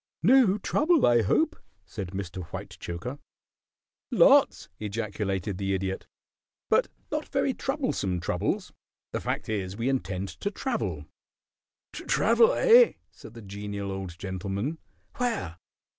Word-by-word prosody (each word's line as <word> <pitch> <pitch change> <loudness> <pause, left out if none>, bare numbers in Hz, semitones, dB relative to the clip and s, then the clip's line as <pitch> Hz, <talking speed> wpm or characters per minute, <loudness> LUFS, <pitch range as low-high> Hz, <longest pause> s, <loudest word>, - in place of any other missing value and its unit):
"No 230 -2 +6
trouble, 305 - +3
I 120 -1 +5
hope," 100 - +2 0.3
said 95 - -6
Mr. 95 -1 -5
Whitechoker. 115 - -6 0.9
"Lots!" - - +5
ejaculated 105 -2 -3
the 95 -1 0
Idiot. 95 0 -3 0.6
"But - - +4 0.2
not - - -2
very - - +1
troublesome 90 -2 -1
troubles. 85 - -2 0.4
The - - -3
fact - - -3
is 100 -3 -3
we 120 +3 0
intend 100 -8 -2
to 100 - -4
travel." 260 +6 -3 0.9
"To - - -7
travel, 465 +1 +4
eh?" 480 0 +6 0.2
said - - -13
the 115 - -10
Genial 100 0 -5
Old 95 -3 -6
Gentleman. 100 - -3 0.4
"Where?" 230 - -2
100 Hz, 120 wpm, -27 LUFS, 95-145 Hz, 0.9 s, No